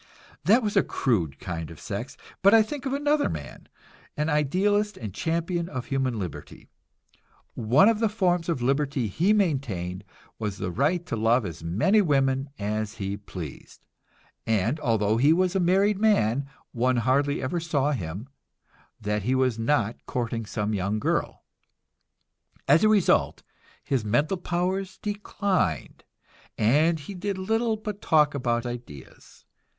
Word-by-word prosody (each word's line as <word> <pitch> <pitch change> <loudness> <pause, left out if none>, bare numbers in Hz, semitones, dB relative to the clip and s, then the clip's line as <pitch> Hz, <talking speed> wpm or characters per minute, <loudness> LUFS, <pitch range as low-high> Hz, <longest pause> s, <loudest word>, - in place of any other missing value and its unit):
That 225 +8 +5
was 210 -1 -2
a - - +6
crude 85 - -1
kind 80 -4 -5
of 80 - -11
sex; - - -6 0.2
but 200 +3 +6
I 225 - +7
think 275 +5 -5
of 265 - -2
another 290 +1 +1
man, - - -7 0.5
an 150 +1 0
idealist 195 +8 +1
and 105 -5 -6
champion 170 - -2
of 130 -3 -5
human 130 -3 -1
liberty. 90 -8 -7 0.8
One 125 - +4
of 225 -2 +3
the 225 -1 +2
forms 180 -5 0
of 130 -8 -1
liberty 135 -1 0
he 165 - +1
maintained 125 - -1 0.4
was 105 -3 -3
the 90 - -3
right 155 - 0
to 145 - -3
love 115 +1 +2
as 80 -3 -7
many 115 - +3
women 135 -4 +1
as 105 0 -2
he 100 -2 -3
pleased, 90 -7 -9 0.6
and 110 +6 +1
although 110 -6 +1
he 140 +6 +4
was 185 +2 +1
a - - +3
married 190 +3 +2
man, 140 - +2 0.2
one 125 +1 +1
hardly 140 +5 +1
ever 135 +7 -2
saw 150 -3 0
him 95 - -4 0.7
that 105 0 -1
he 125 +6 0
was 130 -3 +1
not 115 -2 0
courting 115 -2 -3
some 105 0 -2
young 100 +1 -1
girl. 105 - -1 1.2
As 150 +7 +5
a 215 - +5
result, 210 -4 +2 0.4
his 135 -5 -1
mental 145 - +1
powers 185 +2 -2
declined, 200 - -2 0.5
and 155 +9 +3
he 145 - -8
did 195 +1 -3
little 220 +4 0
but 210 -1 -6
talk 150 -2 +3
about 120 -3 -1
ideas. 120 - -10
140 Hz, 150 wpm, -26 LUFS, -, 1.2 s, I